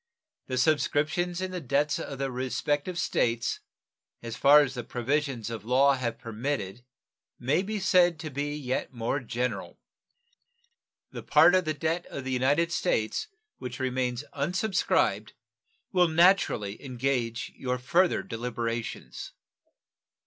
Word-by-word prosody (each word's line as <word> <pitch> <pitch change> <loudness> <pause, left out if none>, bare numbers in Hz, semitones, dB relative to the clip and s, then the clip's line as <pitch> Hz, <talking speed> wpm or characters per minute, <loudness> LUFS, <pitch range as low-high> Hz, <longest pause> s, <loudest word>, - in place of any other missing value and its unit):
The 130 - -2
subscriptions 155 +5 +1
in 185 0 -3
the 180 -1 -4
debts 145 +2 +1
of 140 - -6
the 135 0 -2
respective 145 +6 -2
States 115 -7 0 0.6
as 115 -1 -5
far 145 +3 +7
as 135 -3 -1
the 120 -2 -5
provisions 125 -1 -2
of 115 -2 -5
the 105 - -17
law 135 +3 +5
have 120 -3 -2
permitted 115 -2 -4 0.5
may 140 +8 +1
be 210 +2 -3
said 175 -2 +4
to 155 - -6
be 145 +2 -3
yet 130 -3 -3
more 120 +3 -2
general. 125 0 -4 1.3
The - - -7
part 160 +3 +5
of 185 -1 +3
the 155 -1 -1
debt 160 +4 -2
of 140 - -6
the 130 - -4
United 145 +7 +2
States 170 - 0 0.3
which 125 0 -6
remains 130 0 -1
unsubscribed 155 - 0 0.6
will 180 -2 +4
naturally 160 - +3
engage 125 -3 -2
your 125 -1 -2
further 170 +9 +2
deliberations. 115 0 -5
135 Hz, 135 wpm, -28 LUFS, 120-160 Hz, 1.3 s, far